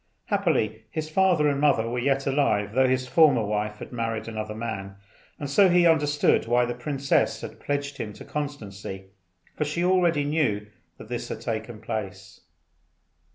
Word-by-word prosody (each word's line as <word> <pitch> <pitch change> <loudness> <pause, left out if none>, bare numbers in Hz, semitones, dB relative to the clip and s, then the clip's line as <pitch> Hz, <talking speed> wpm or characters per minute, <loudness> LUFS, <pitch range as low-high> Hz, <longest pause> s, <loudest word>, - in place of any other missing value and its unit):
Happily 160 - 0
his 155 +6 -4
father 180 -4 +3
and 140 -1 0
mother 135 -6 +3
were 120 +1 -2
yet 135 +2 +1
alive, 135 -8 +1
though 130 +2 +4
his 130 0 0
former 140 -7 +4
wife 105 0 -2
had - - -9
married 115 -2 -3
another 110 -1 -5
man; 105 -4 -5 0.4
and 145 - -5
so 190 +7 +5
he 175 0 +4
understood 145 -7 +3
why 120 +1 +3
the 120 - -3
princess 135 +2 0
had - - -8
pledged 145 0 -3
him 105 - -4
to - - -12
constancy, 100 -10 -6 0.4
for - - 0
she 150 +4 -1
already 175 -5 +3
knew 140 -9 0 0.3
that - - -11
this 120 +1 -4
had 110 - -5
taken 110 -1 -4
place. 105 -4 -6
125 Hz, 165 wpm, -26 LUFS, 110-150 Hz, 0.4 s, so